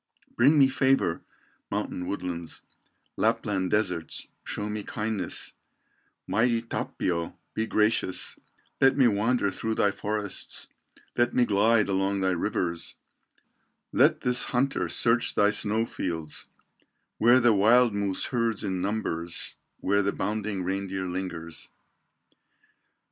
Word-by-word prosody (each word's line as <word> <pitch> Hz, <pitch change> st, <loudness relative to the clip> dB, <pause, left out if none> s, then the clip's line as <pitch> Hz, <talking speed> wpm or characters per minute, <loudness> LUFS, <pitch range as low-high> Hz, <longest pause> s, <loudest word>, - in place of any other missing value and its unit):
Bring 140 Hz, +6 st, +5 dB
me 135 Hz, -2 st, +7 dB
favor, 130 Hz, -10 st, +1 dB, 0.5 s
mountain 90 Hz, -, -3 dB
woodlands, 85 Hz, -4 st, -5 dB, 0.5 s
Lapland 95 Hz, -3 st, 0 dB
deserts, 90 Hz, -6 st, -1 dB, 0.2 s
show 105 Hz, -, -4 dB
me 105 Hz, 0 st, -3 dB
kindness, 105 Hz, -3 st, -2 dB, 0.7 s
Mighty 115 Hz, +1 st, +1 dB
Tapio, 85 Hz, -6 st, -3 dB, 0.2 s
be 110 Hz, 0 st, -1 dB
gracious, 105 Hz, -4 st, +2 dB, 0.5 s
Let 135 Hz, +1 st, +5 dB
me 130 Hz, -3 st, +6 dB
wander 110 Hz, 0 st, +1 dB
through 110 Hz, +3 st, -3 dB
thy 100 Hz, -, +2 dB
forests, 105 Hz, -1 st, -4 dB, 0.5 s
Let 120 Hz, 0 st, +1 dB
me 125 Hz, -, +4 dB
glide 110 Hz, +1 st, +3 dB
along 95 Hz, 0 st, 0 dB
thy 95 Hz, 0 st, +2 dB
rivers, 85 Hz, -2 st, -2 dB, 1.0 s
Let -, -, +4 dB
this 125 Hz, 0 st, +3 dB
hunter 135 Hz, +2 st, 0 dB
search 120 Hz, +1 st, +1 dB
thy 105 Hz, 0 st, +4 dB
snow 110 Hz, +1 st, +1 dB
fields, 80 Hz, -8 st, -4 dB, 0.7 s
Where 120 Hz, +3 st, +6 dB
the 120 Hz, -2 st, +4 dB
wild 115 Hz, +3 st, +5 dB
moose 100 Hz, -2 st, -1 dB
herds 115 Hz, -3 st, 0 dB
in 95 Hz, -1 st, -2 dB
numbers 85 Hz, -5 st, -1 dB, 0.3 s
Where 100 Hz, +1 st, +2 dB
the 100 Hz, 0 st, 0 dB
bounding 105 Hz, -1 st, -2 dB
reindeer 95 Hz, 0 st, -3 dB
lingers. 90 Hz, -3 st, -5 dB
105 Hz, 115 wpm, -27 LUFS, 95-115 Hz, 1.0 s, me